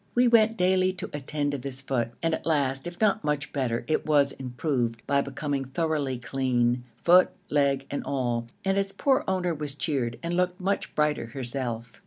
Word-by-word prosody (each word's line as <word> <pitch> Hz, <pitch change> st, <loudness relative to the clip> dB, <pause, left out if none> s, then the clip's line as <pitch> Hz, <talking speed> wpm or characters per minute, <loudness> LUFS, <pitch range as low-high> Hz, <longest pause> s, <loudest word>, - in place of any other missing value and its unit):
We 245 Hz, +1 st, +5 dB
went 225 Hz, -1 st, +4 dB
daily 185 Hz, 0 st, +3 dB
to 185 Hz, -, -6 dB
attend 145 Hz, 0 st, -2 dB
to 140 Hz, -, -3 dB
this 130 Hz, 0 st, -5 dB
foot 130 Hz, -4 st, -1 dB
and 165 Hz, 0 st, +2 dB
at -, -, -2 dB
last, 140 Hz, -2 st, +1 dB
if 175 Hz, 0 st, -8 dB
not 215 Hz, 0 st, +2 dB
much 150 Hz, -1 st, -1 dB
better, 125 Hz, -5 st, -1 dB
it 155 Hz, -, +1 dB
was 145 Hz, -2 st, +3 dB
improved 125 Hz, -3 st, -2 dB
by 140 Hz, 0 st, +2 dB
becoming 140 Hz, 0 st, -3 dB
thoroughly 140 Hz, -1 st, -1 dB
clean, 125 Hz, -1 st, 0 dB
foot, 180 Hz, +5 st, +6 dB, 0.2 s
leg 140 Hz, -2 st, +2 dB
and 140 Hz, -, -2 dB
all, 120 Hz, -4 st, -1 dB, 0.2 s
and 195 Hz, +1 st, +2 dB
its 195 Hz, 0 st, -1 dB
poor 275 Hz, 0 st, +2 dB
owner 185 Hz, -2 st, 0 dB
was 150 Hz, -2 st, -2 dB
cheered 135 Hz, -5 st, -1 dB
and 170 Hz, +1 st, -1 dB
looked 180 Hz, +1 st, 0 dB
much 195 Hz, +2 st, -2 dB
brighter 150 Hz, -5 st, +1 dB
herself. 120 Hz, -2 st, -4 dB
145 Hz, 185 wpm, -27 LUFS, 130-175 Hz, 0.2 s, foot